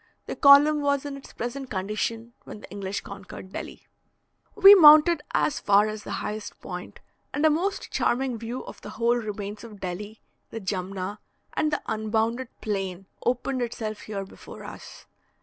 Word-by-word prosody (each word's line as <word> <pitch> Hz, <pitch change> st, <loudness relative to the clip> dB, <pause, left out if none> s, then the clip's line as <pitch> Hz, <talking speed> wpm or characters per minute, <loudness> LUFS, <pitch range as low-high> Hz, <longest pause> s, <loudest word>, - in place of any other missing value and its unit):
The -, -, -5 dB
column 290 Hz, +1 st, +7 dB
was 280 Hz, -1 st, +1 dB
in 285 Hz, -1 st, -5 dB
its 275 Hz, -, -12 dB
present 255 Hz, +3 st, -5 dB
condition 220 Hz, +4 st, -3 dB
when 210 Hz, -, -10 dB
the -, -, -13 dB
English 200 Hz, 0 st, -4 dB
conquered 190 Hz, -1 st, -10 dB
Delhi. -, -, -7 dB, 0.7 s
We 400 Hz, -1 st, +10 dB
mounted 310 Hz, -2 st, +8 dB
as 295 Hz, -, +1 dB
far 205 Hz, +1 st, +4 dB
as 215 Hz, 0 st, -5 dB
the -, -, -10 dB, 0.2 s
highest 210 Hz, 0 st, -6 dB
point, -, -, -8 dB, 0.4 s
and 290 Hz, +2 st, +1 dB
a 310 Hz, -, +6 dB
most 370 Hz, +6 st, -2 dB
charming 250 Hz, -2 st, 0 dB
view 235 Hz, +3 st, -5 dB
of -, -, -11 dB
the -, -, -8 dB
whole 235 Hz, +2 st, +1 dB
remains 210 Hz, -2 st, -5 dB
of 215 Hz, -3 st, -11 dB
Delhi, 205 Hz, +4 st, -6 dB, 0.3 s
the 225 Hz, -, -6 dB
Jumna, 190 Hz, 0 st, -4 dB, 0.3 s
and 305 Hz, -, 0 dB
the 300 Hz, -, -2 dB
unbounded 220 Hz, +3 st, -1 dB
plain, 195 Hz, -3 st, -3 dB, 0.2 s
opened 255 Hz, +1 st, 0 dB
itself 220 Hz, -3 st, -4 dB
here 200 Hz, -2 st, -5 dB
before -, -, -12 dB
us. -, -, -11 dB
225 Hz, 165 wpm, -26 LUFS, 205-275 Hz, 0.7 s, We